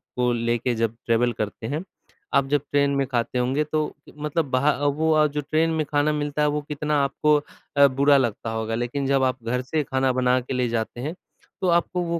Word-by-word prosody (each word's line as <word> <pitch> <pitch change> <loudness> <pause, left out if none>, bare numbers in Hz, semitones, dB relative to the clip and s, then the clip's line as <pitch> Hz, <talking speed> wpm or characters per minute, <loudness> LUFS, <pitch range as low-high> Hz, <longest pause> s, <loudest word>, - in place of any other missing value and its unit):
को 125 -1 +1
लेके 120 +1 0
जब 115 0 -1
ट्रैवल 120 +1 +2
करते 105 +1 -4
हैं। 150 +7 -3 0.5
आप 140 -1 +3
जब 145 -2 +2
ट्रेन 140 0 +3
में 140 0 +1
खाते 125 0 -1
होंगे, 130 +4 +1
तो 155 0 -2 0.2
मतलब 150 +2 -1
बाह 130 +3 +3
अ, 145 0 -3
वो 155 +1 +3
जो 150 0 -3
ट्रेन 155 +3 +1
में 160 -1 0
खाना 145 +1 +1
मिलता 150 0 -2
है, 150 - +4
वो 150 0 0
कितना 150 +1 -2
आपको 150 +2 +2 0.4
अ, 140 0 +8
बुरा 140 +2 +4
लगता 115 -3 -1
होगा। 110 0 -2
लेकिन 120 +4 -2
जब 135 -1 +2
आप 130 -2 -1
घर 125 +2 -1
से 150 +4 -1
खाना 130 -1 0
बना 125 0 +3
के 125 +1 -6
ले 125 -1 +1
जाते 115 +1 -3
हैं, 150 +5 -3 0.5
तो 185 - +1
आपको 175 +1 +1
वो 170 0 -2
140 Hz, 215 wpm, -24 LUFS, 125-150 Hz, 0.5 s, अ